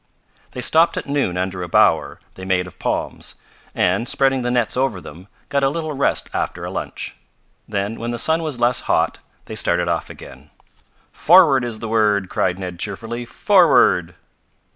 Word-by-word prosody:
They 125 - -5
stopped 160 +7 +3
at - - -3
noon 140 -11 -1
under 90 0 -3
a 90 - -5
bower - - +2
they 95 - -11
made 95 -1 0
of 90 - -14
palms, - - -3 0.4
and, 95 +7 +1
spreading 135 -1 +2
the 120 - -2
nets 120 -2 0
over 130 -6 0
them, 90 +3 -12 0.2
got 140 -1 0
a 135 - +4
little 155 +1 -4
rest 140 0 0
after - - -3
a - - -5
lunch. - - -5 0.5
Then, 100 +1 -3
when 115 - -4
the 120 - -3
sun 160 +8 +2
was 150 -6 -3
less 120 +1 +2
hot, - - +1 0.3
they - - -8
started 85 0 0
off 85 -1 -2
again. - - -13 0.6
"Forward 160 -7 +5
is 120 -2 -4
the 115 - -6
word!" 105 -4 +1
cried 90 -1 0
Ned 90 -2 -7
cheerfully. 115 +5 -4
"Forward!"' - - +3
115 Hz, 175 wpm, -20 LUFS, 95-135 Hz, 0.6 s, Forward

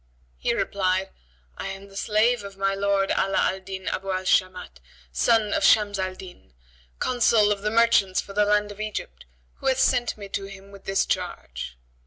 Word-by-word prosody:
He - - 0
replied, 190 -1 0 0.5
"I - - -4
am 195 +1 -7
the 195 - -17
slave 215 +3 +2
of 200 -1 -9
my 195 0 +1
lord 195 0 +1
Ala 195 0 +1
al 190 - +1
Din 190 0 -8
Abu 195 +1 -3
al 185 0 -1
Shamat, 185 - 0 0.3
son 215 - +2
of - - 0
Shams 205 0 +4
al 185 0 -2
Din, 180 - -13 0.4
Consul 230 -4 +3
of 200 -1 -1
the 210 - 0
merchants 225 -4 +3
for 200 - -6
the 210 +1 +3
land 210 0 +2
of 205 +1 -8
Egypt, 215 -1 -6 0.3
who 270 - -5
hath 260 -1 +3
sent 245 -4 +2
me 200 -1 -8
to 195 0 -3
him 195 0 -12
with 200 -1 -14
this 195 0 +1
charge." - - -4
195 Hz, 190 wpm, -25 LUFS, 190-210 Hz, 0.5 s, Shams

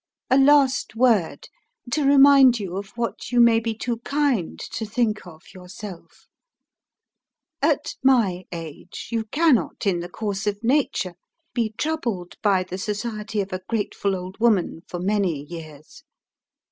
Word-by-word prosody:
"A 260 - +6
last 275 -4 +4
word, 225 -8 +2 0.4
to 300 +3 +1
remind 275 -3 +6
you 190 -3 -5
of 195 0 -5
what 235 0 -4
you 245 - +2
may 235 -1 +6
be 225 -1 -3
too 235 +1 -3
kind 275 - -1
to 225 - -4
think 215 -2 -1
of 160 -2 -13
yourself. 185 0 -11 1.3
"At - - +1
my 210 -9 +3
age, 165 -3 -8
you 225 -1 -1
cannot, 285 -1 +1
in 185 -3 +1
the 175 +1 -6
course 205 +1 -4
of 205 +2 -2
nature, 240 -8 +1 0.4
be 225 -3 -1
troubled 235 - -2
by 195 -3 +3
the 185 +1 -7
society 210 +1 -3
of 195 -1 -6
a 185 - -3
grateful 205 -3 -1
old 185 +2 -8
woman 210 -8 +2
for 175 - -5
many 185 -6 0
years. 155 -2 -11
215 Hz, 145 wpm, -23 LUFS, 185-240 Hz, 1.3 s, A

